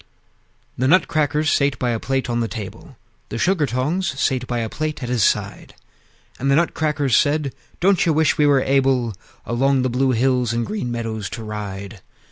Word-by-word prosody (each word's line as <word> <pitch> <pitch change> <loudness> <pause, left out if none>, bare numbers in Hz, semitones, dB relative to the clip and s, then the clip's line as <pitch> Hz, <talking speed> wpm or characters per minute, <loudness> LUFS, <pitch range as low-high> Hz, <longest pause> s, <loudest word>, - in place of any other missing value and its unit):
The 130 - +2
Nutcrackers 155 -2 +2
sate 140 -1 +2
by 125 -1 0
a 115 - -1
plate 135 +1 -1
on 120 -1 -1
the 115 - 0
table; 130 - -8 0.3
The - - -4
Sugar 170 +1 +1
tongs 135 +5 -1
sate 130 -3 0
by 120 - -2
a 115 -1 -1
plate 155 +3 -4
at 120 - -4
his 125 -4 +1
side; - - -1 0.6
And 135 - 0
the 140 - +4
Nutcrackers 150 -5 +1
said, 145 -2 +2 0.3
"Don't 190 +1 +3
you 165 - +2
wish 155 0 +2
we 150 - +5
were 140 -2 +4
able 130 -4 +2 0.3
Along 130 +2 +1
the 130 - 0
blue 130 +1 +2
hills 125 -1 +1
and 115 0 -1
green 210 - -3
meadows 110 -3 -4
to 115 - -6
ride? 100 -1 -6
130 Hz, 185 wpm, -21 LUFS, 120-150 Hz, 0.6 s, we